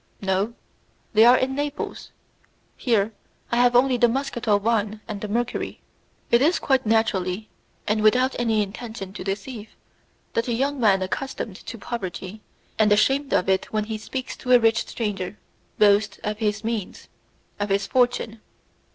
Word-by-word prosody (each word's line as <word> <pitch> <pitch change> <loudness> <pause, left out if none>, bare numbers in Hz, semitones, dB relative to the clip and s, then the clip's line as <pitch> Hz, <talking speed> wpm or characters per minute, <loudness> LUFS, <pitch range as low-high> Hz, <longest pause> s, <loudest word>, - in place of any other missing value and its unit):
"No, 195 +4 -1 0.6
they 220 +1 +7
are 245 +1 +8
in 260 +1 0
Naples. 290 +1 -4 0.7
Here 225 -3 +1 0.4
I 235 - +1
have 245 0 +4
only 250 +1 +4
the 240 0 +5
muscatel 240 -5 0
wine 215 -1 0
and 210 -3 -5
the 215 - -3
mercury." 235 +3 -2 0.5
It 235 - +5
is 320 +6 +4
quite 265 -4 +1
naturally 215 -2 +1 0.4
and 210 +1 +1
without 250 +5 +3
any 225 -3 +2
intention 205 -1 -7
to 200 - -7
deceive, 210 +3 -5 0.6
that 230 +1 0
a 240 - 0
young 275 +4 0
man 195 -5 +4
accustomed 220 -1 -4
to 230 - -6
poverty, 200 -2 -6 0.4
and 215 -1 +4
ashamed 270 +7 +3
of 180 - +2
it 190 0 +2
when 215 -1 0
he 215 0 -5
speaks 260 +4 -5
to 250 - +1
a 245 - +8
rich 225 -1 +2
stranger, 205 -3 -3 0.4
boasts 205 0 +4
of 210 0 -3
his 215 -1 -1
means 225 -4 -4 0.5
of 205 0 -1
his 195 0 +1
fortune. 240 -2 0
220 Hz, 160 wpm, -24 LUFS, 205-245 Hz, 0.7 s, are